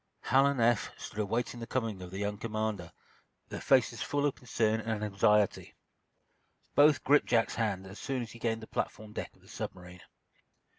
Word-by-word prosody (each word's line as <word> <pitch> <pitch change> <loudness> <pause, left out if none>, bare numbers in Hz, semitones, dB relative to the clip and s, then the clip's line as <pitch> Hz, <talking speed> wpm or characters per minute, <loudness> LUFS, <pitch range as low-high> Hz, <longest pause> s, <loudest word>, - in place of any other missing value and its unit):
Hal 135 +4 +4
and 140 -2 0
Eph 115 -1 +3
stood 105 - -8
awaiting 115 +3 -1
the 115 - -6
coming 115 -7 -2
of 90 - -7
their 95 +2 -6
young 105 0 -1
commander, 110 -5 -3 0.6
their - - -6
faces - - +3
full 145 0 0
of 145 - +2
concern 110 -2 0
and 110 -1 -2
anxiety. 105 0 +2 1.0
Both 145 -1 +5
gripped 145 +2 +4
Jack's 115 -2 +2
hand 100 -5 -1
as 95 +2 -10
soon 135 -3 -2
as 115 - -9
he 115 - -12
gained 115 -1 -1
the - - -9
platform 105 0 -4
deck - - -6
of - - -25
the - - -20
submarine. 90 -1 -7
110 Hz, 185 wpm, -31 LUFS, 105-120 Hz, 1.0 s, Both